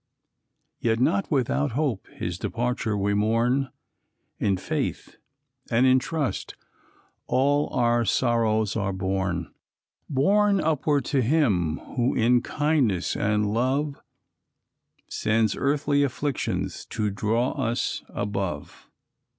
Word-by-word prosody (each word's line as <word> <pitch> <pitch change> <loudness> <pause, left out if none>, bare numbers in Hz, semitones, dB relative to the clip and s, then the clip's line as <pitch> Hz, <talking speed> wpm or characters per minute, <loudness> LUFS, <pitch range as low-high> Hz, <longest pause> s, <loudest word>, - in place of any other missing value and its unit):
Yet 115 -1 +1
not 180 +9 +1
without 140 -1 0
hope 140 -6 -1
his 90 0 -5
departure 120 -3 -1
we 100 +1 0
mourn, 115 +6 +1 0.7
In 100 -3 +1
faith - - -3 0.5
and 120 +3 +3
in 130 0 +5
trust, 145 +1 -3 0.7
all 145 +3 +2
our 120 -1 +2
sorrows 110 -1 +1
are 100 -3 -1
borne, 95 -2 -2 0.6
Borne 200 +9 +3
upward 150 -4 +1
to 135 - +4
Him 110 - +2 0.2
who 125 +1 +1
in 120 +1 +3
kindness 140 - 0
and 105 0 +1
love 135 +5 0 1.1
Sends 110 -1 +1
earthly 145 0 +1
afflictions 140 0 -2
to 110 -3 -2
draw 110 +5 0
us 120 -4 -2
above. 95 -7 -4
120 Hz, 105 wpm, -25 LUFS, 105-140 Hz, 1.1 s, in